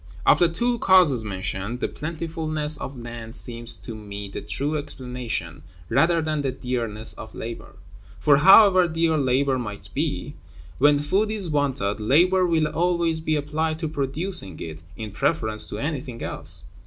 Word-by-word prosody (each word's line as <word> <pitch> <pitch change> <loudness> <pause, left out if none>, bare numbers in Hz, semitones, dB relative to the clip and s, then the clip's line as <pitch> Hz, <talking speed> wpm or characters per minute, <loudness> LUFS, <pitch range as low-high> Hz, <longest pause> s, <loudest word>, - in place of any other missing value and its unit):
Of - - +6
the 175 - +5
two 240 +8 0
causes 175 - +5
mentioned, 100 +3 -3
the - - 0
plentifulness 155 -1 -3
of 135 - -7
land 120 -1 -8
seems 120 -1 -3
to 115 - -7
me 100 -2 -7
the - - -6
true 145 +3 -1
explanation, 125 - -4 0.3
rather 165 -1 +3
than 155 -1 -1
the 135 -2 -1
dearness 120 -4 -2
of 110 - -10
labor; 115 +1 -7 0.4
for, 145 -2 +5
however 185 +3 +7
dear 165 0 +1
labor 135 -1 +1
may 105 -4 -5
be, - - -2 0.5
when 145 +2 +5
food 190 +9 +1
is 200 -6 0
wanted, 135 -9 0
labor 180 - +3
will 160 -2 +2
always 170 -2 +1
be 155 -1 0
applied 155 +2 -1
to 160 0 -3
producing 145 - -3
it 80 -1 -7 0.2
in 110 -2 -6
preference 110 0 0
to - - -5
anything 140 -5 -4
else. 80 +2 -2
145 Hz, 155 wpm, -24 LUFS, 115-165 Hz, 0.5 s, however